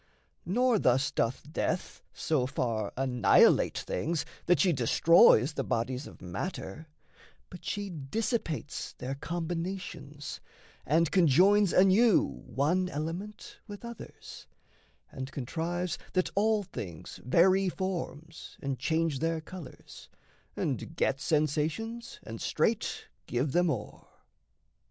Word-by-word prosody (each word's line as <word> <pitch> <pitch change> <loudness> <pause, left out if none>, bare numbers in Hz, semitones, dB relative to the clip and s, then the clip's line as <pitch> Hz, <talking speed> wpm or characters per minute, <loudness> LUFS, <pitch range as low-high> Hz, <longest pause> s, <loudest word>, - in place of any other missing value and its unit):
Nor 240 +4 +3
thus 130 +1 +2
doth 115 +2 -1
death 180 - -2
So 145 -6 0
far 115 -5 -2
annihilate 125 -3 +4
things 160 - -2 0.2
that 175 -3 +4
she 180 +3 +4
destroys 145 - +5
The 135 - -2
bodies 130 +3 -2
of - - -14
matter; 155 - -5 0.6
but 180 - -10
she 205 -1 -3
dissipates 165 - -3
Their 130 +2 -5
combinations, 165 -2 -5 0.5
and 160 +2 +3
conjoins 190 +4 +5
anew 195 +4 +5
One 155 +10 -1
element 170 +8 -6
with 205 +2 -9
others; 235 -2 -10 0.6
and 130 0 -6
contrives 165 +6 -3
That 185 -1 +1
all 215 +1 +2
things 90 - -8
vary 185 +8 +4
forms 165 -4 -5
and 135 -3 -3
change 160 0 0
their 165 0 0
colours 160 -3 -11 0.5
And - - -3
get 135 +1 0
sensations 155 +10 -1
and 115 0 -8
straight - - 0 0.2
give 130 +4 -1
them 175 +3 +3
o'er. 115 -8 -5
165 Hz, 110 wpm, -30 LUFS, 135-185 Hz, 0.6 s, destroys